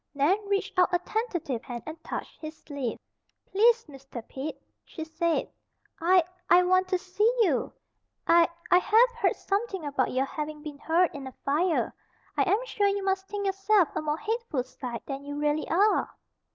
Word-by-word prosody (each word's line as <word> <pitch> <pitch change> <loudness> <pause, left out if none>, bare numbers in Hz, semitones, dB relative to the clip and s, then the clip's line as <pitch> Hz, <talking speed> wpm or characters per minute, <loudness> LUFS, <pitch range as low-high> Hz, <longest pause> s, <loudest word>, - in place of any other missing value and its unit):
Nan 345 +10 +2
reached 400 -1 0
out 360 - +4
a 355 - +4
tentative 350 - -3
hand 240 -3 -7
and 315 +1 -8
touched - - -6
his 310 0 -7
sleeve. 280 -6 -4 0.5
"Please, 460 +3 +4
Mr. 270 -5 -10
Pete," 275 +4 -6 0.2
she 320 - -7
said. 325 +1 0 0.5
"I, 360 +2 +5 0.3
I 360 +1 +7
want 370 +1 +3
to 370 0 +1
see 375 +5 +1
you. 305 - +1 0.5
I, 335 0 +5 0.2
I 360 - +8
have 450 +6 +5
heard 470 - +1
something 395 -4 -2
about 280 -3 0
your 260 +1 +1
having 300 +1 -5
been 295 -2 -8
hurt 335 +3 +2
in 275 -2 -7
a 260 - -9
fire. 315 +4 +1 0.4
I - - +2
am 450 +5 +2
sure 410 -4 +1
you 400 0 0
must 385 0 0
think 405 0 -4
yourself 390 -1 +3
a - - 0
more 300 0 -1
hateful 440 - -2
sight 250 -2 -7
than 275 0 -5
you 285 0 -6
really 295 +1 0
are." 400 +6 +3
340 Hz, 180 wpm, -28 LUFS, 290-395 Hz, 0.5 s, I